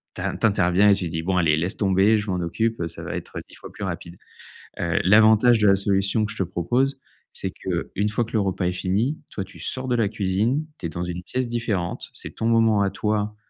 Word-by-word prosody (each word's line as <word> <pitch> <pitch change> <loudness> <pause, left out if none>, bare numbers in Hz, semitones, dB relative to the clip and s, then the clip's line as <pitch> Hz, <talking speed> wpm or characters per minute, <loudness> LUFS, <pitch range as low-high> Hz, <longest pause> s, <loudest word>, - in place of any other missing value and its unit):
t'in - - -3
t'interviens 100 -2 +3
et - - +7
tu 90 -3 -3
dis: 80 0 -3
«Bon, 95 +1 0
allez, 80 -3 +3
laisse 90 +6 -2
tomber, 100 +2 +3
je 105 -1 -5
m'en - - 0
occupe, 110 +7 -1
heu, 85 - -1
ça 80 - -9
va - - -5
être, - - -8
heu, - - -3
10 - - -14
fois - - -11
plus 105 - -8
rapide», 85 -1 -6 0.6
heu, 85 -1 0
l'avantage 110 +4 +6
de 105 - +4
la 100 - +6
solution 100 +2 +1
que 105 - -5
je 110 - -10
te 95 - +1
propose, 120 +11 0 0.4
c'est - - -4
qu'une 105 +2 -3
fois 110 +3 0
que - - -13
le 110 - +2
repas 95 -2 -1
est 90 - +1
fini, 105 +11 0 0.2
toi, 95 - -3
tu 95 - -15
sors 130 0 -3
de 120 - +2
la 110 -3 +2
cuisine, 110 +8 0
tu - - -6
es - - -7
dans 85 +3 -4
une 90 0 -5
pièce 125 +2 -3
différente, 110 -7 -2
c'est - - -5
ton 115 - -3
moment 115 -2 +4
à 100 - +2
toi, 105 0 -1
100 Hz, 245 wpm, -23 LUFS, 90-110 Hz, 0.6 s, et